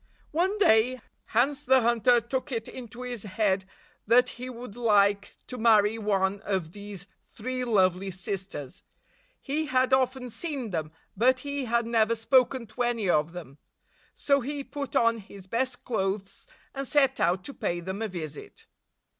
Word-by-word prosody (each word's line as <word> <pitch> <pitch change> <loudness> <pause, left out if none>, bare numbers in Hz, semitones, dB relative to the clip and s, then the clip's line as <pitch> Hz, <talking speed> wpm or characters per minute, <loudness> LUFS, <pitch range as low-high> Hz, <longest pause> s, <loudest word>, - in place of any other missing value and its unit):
One 370 +6 +1
day, 250 - +4 0.3
Hans 275 +5 +1
the 265 -1 +5
Hunter 240 +1 +4
took 260 +5 -4
it 225 -2 -3
into 245 -1 -9
his 245 -3 -5
head 195 -1 0 0.4
that 245 +3 +5
he 250 +1 -7
would 245 -3 -9
like 205 -4 +2
to 250 - -7
marry 220 -1 +4
one 200 -2 +1
of 190 -5 -2
these 200 -1 -8 0.2
three 255 +3 -3
lovely 190 -4 +2
sisters. 190 -6 -5 0.6
He 305 +3 -2
had 255 -1 +2
often 260 -1 +1
seen 265 - -4
them, 155 -3 -3 0.2
but 255 +5 +3
he 280 -1 -3
had 235 0 +1
never 230 -1 +2
spoken 250 +2 +2
to 220 +3 -7
any 240 -4 0
of 150 +1 +1
them. 150 -5 -10 0.6
So 280 -1 +2
he 280 +3 -4
put 280 -1 -6
on 230 0 +3
his 195 -2 -12
best 255 +6 -1
clothes, 195 -3 -3 0.3
and 275 -1 -4
set 270 -2 +3
out 180 +2 +1
to 280 - -7
pay 175 -8 -2
them 190 +4 -5
a 225 - 0
visit. 160 -6 -8
230 Hz, 160 wpm, -27 LUFS, 200-255 Hz, 0.6 s, the